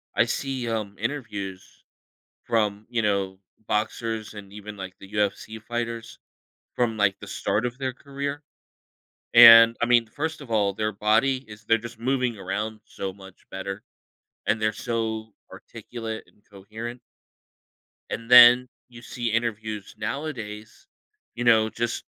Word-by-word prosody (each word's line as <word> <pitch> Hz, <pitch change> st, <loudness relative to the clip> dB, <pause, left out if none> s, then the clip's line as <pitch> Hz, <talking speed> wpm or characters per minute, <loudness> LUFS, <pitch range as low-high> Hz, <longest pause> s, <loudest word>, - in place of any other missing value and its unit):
I 120 Hz, -, +4 dB
see, 130 Hz, 0 st, -3 dB
um, 105 Hz, -3 st, -3 dB
interviews 105 Hz, -7 st, -5 dB, 0.6 s
from, 105 Hz, -2 st, 0 dB
you 115 Hz, -2 st, 0 dB
know, 100 Hz, -2 st, -1 dB, 0.3 s
boxers 110 Hz, 0 st, -2 dB
and 100 Hz, -2 st, -10 dB
even, 105 Hz, 0 st, -9 dB
like, 95 Hz, -1 st, -8 dB
the 95 Hz, -, -13 dB
UFC 105 Hz, +2 st, -1 dB
fighters 115 Hz, 0 st, -5 dB, 0.6 s
from, 115 Hz, -2 st, 0 dB
like, 100 Hz, -2 st, +2 dB
the -, -, -9 dB
start 110 Hz, +4 st, -1 dB
of 125 Hz, +2 st, -6 dB
their 130 Hz, -1 st, -2 dB
career 140 Hz, +2 st, -5 dB, 0.9 s
and 115 Hz, -1 st, +10 dB
I -, -, +3 dB
mean, 120 Hz, -1 st, +4 dB
first 155 Hz, +7 st, -4 dB
of 135 Hz, -, -11 dB
all, 105 Hz, -3 st, +2 dB
their 105 Hz, +2 st, -1 dB
body 110 Hz, +6 st, +1 dB
is 105 Hz, 0 st, -12 dB
they're 115 Hz, +2 st, +4 dB
just 115 Hz, 0 st, -9 dB
moving 125 Hz, -2 st, 0 dB
around 105 Hz, +3 st, -4 dB
so 95 Hz, -1 st, -5 dB
much 95 Hz, -1 st, -16 dB
better, 95 Hz, +1 st, -5 dB, 0.6 s
and 110 Hz, 0 st, +1 dB
they're 110 Hz, -, +2 dB
so 110 Hz, -1 st, -3 dB, 0.2 s
articulate 115 Hz, -2 st, -7 dB
and -, -, -27 dB
coherent 110 Hz, +5 st, -8 dB, 1.1 s
and 115 Hz, +1 st, -5 dB
then 125 Hz, +1 st, +9 dB, 0.2 s
you 120 Hz, -1 st, -13 dB
see 120 Hz, 0 st, -5 dB
interviews 110 Hz, -3 st, -3 dB
nowadays, 110 Hz, -, -6 dB, 0.5 s
you 120 Hz, -, -3 dB
know, 110 Hz, -2 st, +5 dB
just 120 Hz, +1 st, -3 dB
110 Hz, 140 wpm, -25 LUFS, 105-120 Hz, 1.1 s, and